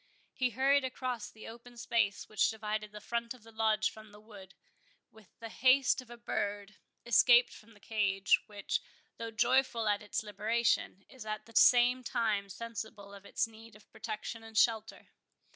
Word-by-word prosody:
He 255 -1 0
hurried 270 +4 +2
across 255 -2 -4
the 220 - -12
open 240 +1 -12
space 230 -3 0
which 215 - +2
divided 215 -1 -4
the 210 - -9
front 235 +3 -3
of 240 - -19
the 225 - -15
Lodge 220 -1 +1
from 215 -1 -14
the 210 - -15
wood, 205 -3 -14 0.6
with 220 -3 -20
the 230 - -8
haste 255 +2 +3
of 250 - -17
a 240 - -10
bird, 205 -3 -4 0.3
escaped 240 +1 +5
from 225 0 -16
the - - -19
cage, 200 -3 +1
which, 205 -2 -3 0.4
though 230 0 -5
joyful 235 0 +1
at 205 -1 +1
its 210 +1 -3
liberation, 210 -1 0
is 260 -4 -11
at 215 0 -5
the 230 - -18
same 250 +1 +5
time 215 -4 -1
sensible 220 -1 -7
of 200 0 -12
its - - 0
need 225 -1 -15
of 210 - -20
protection 225 +2 -6
and 225 -1 -9
shelter. 220 -1 +1
220 Hz, 175 wpm, -32 LUFS, 210-235 Hz, 0.6 s, escaped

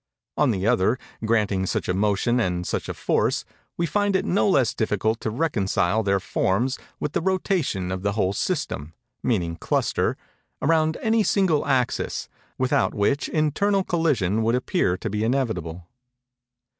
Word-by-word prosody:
On 150 - +3
the 95 -4 -1
other, 110 +3 +3 0.3
granting 105 -4 +1
such - - -2
a 90 - +1
motion 105 +5 +1
and 90 -5 -1
such - - -3
a - - -2
force, - - 0 0.3
we 170 - +1
find 205 +3 +1
it 190 - +1
no 200 +2 +2
less 135 - +3
difficult 110 +1 0
to - - -1
reconcile 110 - +1
their 100 -2 +1
forms 110 +7 0 0.2
with 150 - -2
the - - 0
rotation 170 - 0
of 95 0 -3
the 100 +1 0
whole 100 -2 +1
system 95 - -3 0.3
[meaning 85 -8 -1
cluster] - - 0 0.4
around 160 +1 +2
any 225 0 +3
single 190 -8 +2
axis, 130 -3 0 0.3
without 130 +2 +1
which 130 +7 +1
internal 190 +6 +1
collision 130 - +1
would 115 +2 +2
appear 125 - 0
to - - -5
be 105 +1 -1
inevitable." 90 -10 -2
115 Hz, 155 wpm, -24 LUFS, 95-155 Hz, 0.4 s, On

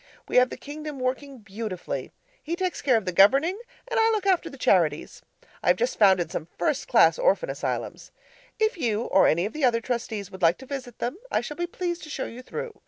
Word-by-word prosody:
We - - 0
have 250 0 +6
the - - -7
kingdom 300 0 -7
working 265 +2 -3
beautifully. 195 - -5 0.3
He 330 +3 -3
takes 370 0 -2
care 255 -4 +3
of 220 - -3
the 185 - -1
governing, 275 - +4 0.3
and - - 0
I 450 0 +4
look 430 -3 0
after 375 -3 +2
the - - -12
charities. - - +1 0.4
I - - -6
have - - +6
just 485 +1 -1
founded 190 -4 +4
some 155 - -4
first 255 +10 -1
class - - +5
orphan - - +2
asylums. - - -4 0.5
If 435 -4 +1
you 230 -5 0
or 190 - +4
any 170 +4 +2
of 215 - -5
the 300 - -4
other 240 -3 +4
Trustees 225 -4 -4
would 190 - -10
like 170 0 +4
to 265 - -12
visit 255 -3 -7
them, 245 +8 -3
I - - +1
shall 295 - -6
be 345 0 -2
pleased 345 0 -4
to - - -11
show 275 - -3
you 240 +2 -8
through. 470 - -6
255 Hz, 225 wpm, -26 LUFS, 210-345 Hz, 0.5 s, have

